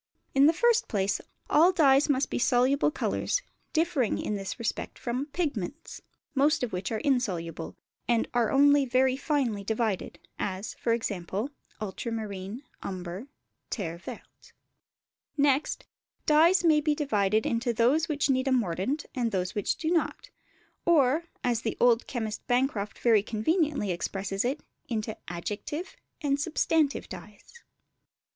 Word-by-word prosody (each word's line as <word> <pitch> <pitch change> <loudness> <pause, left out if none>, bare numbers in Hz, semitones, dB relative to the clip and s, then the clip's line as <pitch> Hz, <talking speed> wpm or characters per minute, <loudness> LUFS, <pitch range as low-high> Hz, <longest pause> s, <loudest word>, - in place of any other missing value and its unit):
In 275 +1 +6
the - - +7
first 475 +6 +2
place, 200 -1 0 0.3
all 335 +5 +5
dyes 290 -5 +4
must 275 -1 +1
be - - -1
soluble 255 +4 +3
colours, - - -1 0.3
differing 320 -8 +1
in - - -2
this 195 -2 -4
respect 230 -3 -3
from 250 +4 -3
pigments; 290 - -4 0.3
most 295 +1 +3
of 240 - -2
which 180 +4 -3
are 220 - 0
insoluble, 180 - -1 0.3
and 235 -1 +2
are 240 -2 +2
only 285 +1 +5
very 260 0 +2
finely 265 -8 -1
divided, 220 -2 -1 0.2
as, 190 +2 -3 0.2
e.g., 210 -6 -1 0.5
ultramarine, 215 +1 -5 0.2
umber, 185 +5 -6 0.4
terre 170 -6 -4
verte. - - -11 0.8
Next, 280 0 +2 0.4
dyes 330 +5 +5
may 310 -3 +5
be 300 0 +1
divided 215 -7 +1
into 235 +1 0
those 255 +9 +2
which 290 -2 +1
need 260 -1 +1
a - - +2
mordant 235 - 0
and 240 -4 -1
those 185 -2 -1
which 205 - 0
do 320 0 -1
not; 355 +9 -1 0.5
or, 315 -1 +3 0.2
as 240 -2 +1
the 225 - -3
old 240 -1 +4
chemist 220 -4 -4
Bancroft 245 -5 0
very 225 -4 +4
conveniently 235 - 0
expresses 195 +3 -2
it, 270 +5 -1 0.3
into 220 -2 -2
adjective 210 - -5 0.3
and 280 -2 +1
substantive 310 -2 +1
dyes. 210 - -11
245 Hz, 135 wpm, -28 LUFS, 210-290 Hz, 0.8 s, the